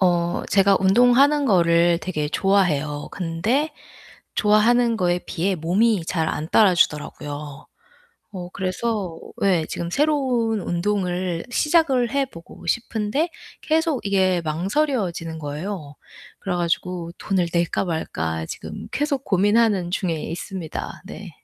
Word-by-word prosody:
어 175 Hz, -2 st, +1 dB
제가 195 Hz, 0 st, +4 dB
운동하는 245 Hz, +9 st, +5 dB
거를 170 Hz, -5 st, +4 dB
되게 155 Hz, -5 st, -2 dB
좋아해요. 155 Hz, -6 st, +1 dB
근데 210 Hz, -, -1 dB, 0.7 s
좋아하는 225 Hz, +2 st, +3 dB
거에 175 Hz, -1 st, +1 dB
비해 185 Hz, +3 st, -1 dB
몸이 185 Hz, +4 st, +1 dB
잘 160 Hz, -2 st, -1 dB
안 155 Hz, 0 st, -3 dB
따라주더라고요. 150 Hz, -6 st, +1 dB, 0.7 s
어 180 Hz, -2 st, -6 dB
그래서 190 Hz, -2 st, -2 dB, 0.3 s
예 175 Hz, -5 st, +2 dB
지금 170 Hz, 0 st, -4 dB
새로운 255 Hz, -, +1 dB
운동을 180 Hz, -1 st, -1 dB
시작을 275 Hz, -5 st, +2 dB
해 275 Hz, 0 st, +1 dB
보고 170 Hz, -6 st, -13 dB
싶은데 230 Hz, -, -1 dB, 0.3 s
계속 320 Hz, -4 st, 0 dB
이게 190 Hz, -3 st, +2 dB
망설여지는 175 Hz, -, -1 dB
거예요. 150 Hz, +1 st, -5 dB, 0.4 s
그래 180 Hz, -2 st, -3 dB
가지고 175 Hz, 0 st, -2 dB
돈을 190 Hz, -3 st, 0 dB
낼까 170 Hz, +2 st, 0 dB
말까 80 Hz, -, -3 dB
지금 -, -, -8 dB
계속 285 Hz, -2 st, -1 dB
고민하는 205 Hz, -1 st, +2 dB
중에 180 Hz, -2 st, -1 dB
있습니다. 165 Hz, +2 st, -6 dB
네. -, -, -9 dB
185 Hz, 270 characters per minute, -22 LUFS, 170-230 Hz, 0.7 s, 운동하는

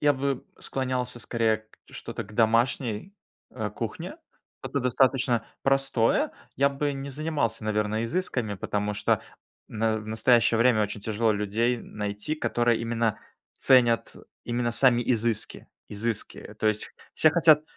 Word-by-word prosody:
я 145 Hz, 0 st, +4 dB
бы 140 Hz, -1 st, -2 dB
склонялся 130 Hz, -2 st, -2 dB
скорее 115 Hz, -2 st, 0 dB
к 110 Hz, 0 st, -25 dB
что-то -, -, -6 dB
к 105 Hz, -, -14 dB
домашней, 115 Hz, -, +1 dB, 0.4 s
э, -, -, -4 dB
кухне. -, -, -5 dB, 0.5 s
Это 140 Hz, -, -2 dB
достаточно 125 Hz, -2 st, +2 dB, 0.2 s
простое. 135 Hz, -4 st, +2 dB, 0.2 s
Я 140 Hz, +2 st, +4 dB
бы 140 Hz, +1 st, -2 dB
не 135 Hz, 0 st, -6 dB
занимался, 145 Hz, -7 st, -2 dB
наверное, 105 Hz, +1 st, 0 dB
изысками, 125 Hz, -, -2 dB
потому 105 Hz, +1 st, -2 dB
что -, -, +1 dB, 0.5 s
в -, -, -17 dB
на 110 Hz, 0 st, +1 dB
в 105 Hz, -, -9 dB
настоящее 115 Hz, +1 st, +3 dB
время 115 Hz, -2 st, +4 dB
очень 105 Hz, 0 st, -3 dB
тяжело 110 Hz, +2 st, +1 dB
людей 110 Hz, +4 st, 0 dB
найти, 105 Hz, +7 st, -4 dB
которые 120 Hz, -5 st, +1 dB
именно 115 Hz, -1 st, 0 dB, 0.4 s
ценят 120 Hz, -3 st, +4 dB, 0.3 s
именно 120 Hz, 0 st, -1 dB
сами 120 Hz, -1 st, +4 dB
изыски 115 Hz, -2 st, -1 dB, 0.2 s
изыски. 110 Hz, +1 st, -4 dB
То -, -, 0 dB
есть 110 Hz, 0 st, 0 dB, 0.2 s
все 155 Hz, -, +5 dB
хотят 155 Hz, -2 st, +5 dB
115 Hz, 140 wpm, -26 LUFS, 110-130 Hz, 0.5 s, все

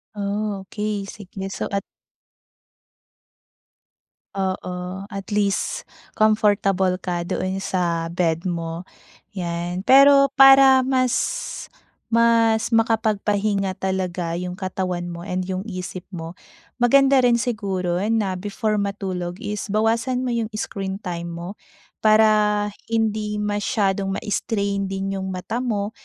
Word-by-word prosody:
Okey 205 Hz, 0 st, -3 dB
sige. 195 Hz, -1 st, -8 dB
So -, -, -4 dB
at 200 Hz, -1 st, -1 dB, 2.5 s
Oo, 185 Hz, 0 st, -4 dB
at 200 Hz, 0 st, -6 dB
least 200 Hz, -1 st, -1 dB, 0.2 s
comfortable 205 Hz, -3 st, +2 dB
ka 175 Hz, -2 st, -2 dB
doon 185 Hz, +2 st, -2 dB
sa 170 Hz, -3 st, -1 dB
bed 170 Hz, -1 st, 0 dB
mo 170 Hz, -1 st, -3 dB, 0.5 s
'yan. 175 Hz, -1 st, -3 dB
Pero 275 Hz, +4 st, +7 dB
para 270 Hz, -1 st, +8 dB
mas 255 Hz, -2 st, +1 dB, 1.0 s
mas 230 Hz, -1 st, +3 dB
makapagpahinga 210 Hz, -3 st, +1 dB
talaga 185 Hz, -3 st, -2 dB
yung 180 Hz, 0 st, -4 dB
katawan 185 Hz, -2 st, -3 dB
mo 170 Hz, 0 st, -7 dB
and 185 Hz, -1 st, -2 dB
'yung 190 Hz, +1 st, -3 dB
isip 185 Hz, -3 st, -6 dB
mo, 165 Hz, 0 st, -7 dB, 0.4 s
maganda 275 Hz, +3 st, +5 dB
rin 240 Hz, -1 st, +4 dB
siguro 195 Hz, -7 st, -1 dB, 0.2 s
na 200 Hz, -5 st, 0 dB
before 210 Hz, +3 st, -2 dB
matulog 190 Hz, -3 st, -3 dB
is 210 Hz, -1 st, -4 dB
bawasan 230 Hz, +4 st, +1 dB
mo 255 Hz, -, -2 dB
yung 230 Hz, -2 st, -1 dB
screen 195 Hz, -2 st, -4 dB
time 170 Hz, -3 st, -5 dB
mo 170 Hz, +4 st, -7 dB, 0.4 s
para 215 Hz, -1 st, +4 dB, 0.2 s
hindi 215 Hz, -2 st, 0 dB
masyadong 200 Hz, -1 st, 0 dB
ma-strain 200 Hz, -1 st, -1 dB
din 195 Hz, 0 st, -3 dB
'yung 190 Hz, 0 st, -4 dB
mata 185 Hz, +5 st, -4 dB
mo. 210 Hz, -4 st, -2 dB
200 Hz, 110 wpm, -22 LUFS, 185-215 Hz, 2.5 s, para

